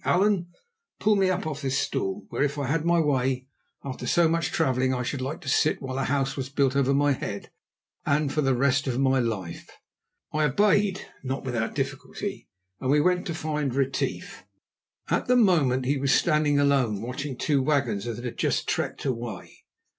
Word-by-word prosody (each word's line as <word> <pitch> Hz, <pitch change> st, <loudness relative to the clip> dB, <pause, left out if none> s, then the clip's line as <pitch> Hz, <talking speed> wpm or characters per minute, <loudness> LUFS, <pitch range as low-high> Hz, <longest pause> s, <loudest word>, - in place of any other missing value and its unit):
Allan, 190 Hz, -1 st, +2 dB, 0.5 s
pull 215 Hz, 0 st, +3 dB
me 195 Hz, -2 st, +3 dB
up 185 Hz, 0 st, -1 dB
off 155 Hz, -2 st, -4 dB
this 135 Hz, -1 st, 0 dB
stool, 95 Hz, -6 st, -2 dB
where, -, -, -3 dB
if 145 Hz, 0 st, +1 dB
I 140 Hz, -, -1 dB
had 150 Hz, +4 st, 0 dB
my 170 Hz, 0 st, +3 dB
way, 130 Hz, -4 st, +1 dB, 0.4 s
after 135 Hz, -2 st, -5 dB
so 170 Hz, -2 st, +4 dB
much 165 Hz, +1 st, 0 dB
travelling, 130 Hz, -4 st, +1 dB
I 125 Hz, -, -2 dB
should 130 Hz, +2 st, -3 dB
like 145 Hz, +7 st, -4 dB
to 150 Hz, -, -12 dB
sit 150 Hz, +3 st, +2 dB
while 135 Hz, -1 st, -4 dB
a -, -, 0 dB
house 135 Hz, 0 st, 0 dB
was 130 Hz, -2 st, -4 dB
built 140 Hz, -1 st, +1 dB
over 140 Hz, -1 st, +2 dB
my 145 Hz, +1 st, +3 dB
head 100 Hz, -6 st, -4 dB, 0.5 s
and 145 Hz, 0 st, +1 dB
for 155 Hz, -, +1 dB
the 135 Hz, -2 st, +2 dB
rest 140 Hz, +2 st, +2 dB
of 125 Hz, -2 st, -1 dB
my 135 Hz, -1 st, +3 dB
life." 100 Hz, -8 st, -3 dB, 0.6 s
I 155 Hz, 0 st, +2 dB
obeyed, 200 Hz, +5 st, +2 dB, 0.2 s
not 135 Hz, +1 st, -3 dB
without 120 Hz, -4 st, -2 dB
difficulty, 135 Hz, -1 st, -4 dB, 0.3 s
and 130 Hz, -, -2 dB
we 145 Hz, +2 st, +4 dB
went 180 Hz, +3 st, +2 dB
to 170 Hz, -, -3 dB
find 150 Hz, -4 st, -2 dB
Retief. 135 Hz, -1 st, -2 dB, 0.7 s
At -, -, 0 dB
the 250 Hz, -, +4 dB
moment 155 Hz, -, +3 dB
he 140 Hz, +2 st, +1 dB
was 135 Hz, 0 st, +1 dB
standing 150 Hz, -3 st, +3 dB
alone, 135 Hz, -7 st, +2 dB
watching 130 Hz, +2 st, -5 dB
two 145 Hz, -1 st, +1 dB
wagons 125 Hz, -7 st, 0 dB
that 120 Hz, +1 st, -5 dB
had 120 Hz, -, -6 dB
just -, -, 0 dB
trekked -, -, -2 dB
away. 120 Hz, -7 st, -5 dB
140 Hz, 190 wpm, -26 LUFS, 130-155 Hz, 0.7 s, so